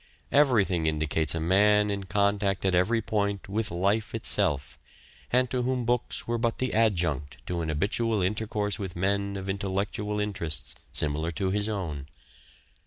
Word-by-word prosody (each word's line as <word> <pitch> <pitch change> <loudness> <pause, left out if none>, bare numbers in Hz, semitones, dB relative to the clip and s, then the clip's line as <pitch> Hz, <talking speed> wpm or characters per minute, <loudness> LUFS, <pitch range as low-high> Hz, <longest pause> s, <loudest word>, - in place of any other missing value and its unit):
Everything 105 - +3
indicates 80 +1 +1
a - - -1
man 105 +5 +3
in 100 -1 -3
contact 100 0 +1
at 95 - +2
every 105 +6 +2
point 100 -2 -1
with 110 +3 -1
life 100 +6 0
itself, 70 -10 0 0.5
and 125 +1 +3
to 125 - 0
whom 125 -1 -1
books 120 +1 0
were 120 0 -1
but 115 0 0
the 130 - -1
adjunct 85 - +1
to 85 +2 -2
an 80 - -3
habitual 105 +8 0
intercourse 105 +1 -1
with 95 -4 -5
men 100 +2 0
of 95 0 -6
intellectual 100 +2 -2
interests 90 -8 -2 0.2
similar 75 +2 0
to 95 +2 -1
his 105 +2 0
own. 80 -9 -4
100 Hz, 155 wpm, -27 LUFS, 85-110 Hz, 0.5 s, Everything